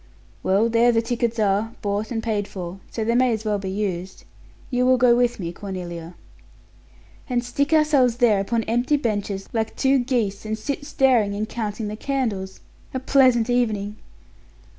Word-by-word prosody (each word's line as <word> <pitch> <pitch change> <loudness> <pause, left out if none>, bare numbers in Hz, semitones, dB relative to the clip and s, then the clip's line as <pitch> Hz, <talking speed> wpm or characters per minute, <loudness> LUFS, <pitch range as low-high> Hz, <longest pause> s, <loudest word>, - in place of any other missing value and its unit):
"Well, 200 +4 +2
there 230 +1 +4
the 230 -1 +1
tickets 235 0 -1
are, 210 +1 +1
bought 205 +1 -1
and 225 -2 -3
paid 210 -3 -1
for, 180 0 -7
so 225 - -3
they 230 +2 +1
may 250 +1 +3
as 220 0 -4
well 210 -1 0
be 195 -1 -4
used. 190 -2 -4 0.5
You 250 0 +1
will 255 0 +5
go 245 -1 +5
with 245 -2 +1
me, 170 -3 -3
Cornelia." 175 -3 -7 1.1
"And 245 -1 0
stick 280 +5 -1
ourselves 300 -6 +4
there 230 -5 +4
upon 225 +4 0
empty 240 +7 +1
benches, 205 -6 -2
like 220 -1 -1
two 270 0 +3
geese, 235 -6 -1
and 220 0 -3
sit 285 +5 -4
staring 250 -9 +2
and 215 +1 -2
counting 215 -1 -4
the 210 - -4
candles! 215 -7 -3 0.3
A - - 0
pleasant 255 -3 +4
evening?" 215 -4 0
225 Hz, 170 wpm, -23 LUFS, 205-245 Hz, 1.1 s, will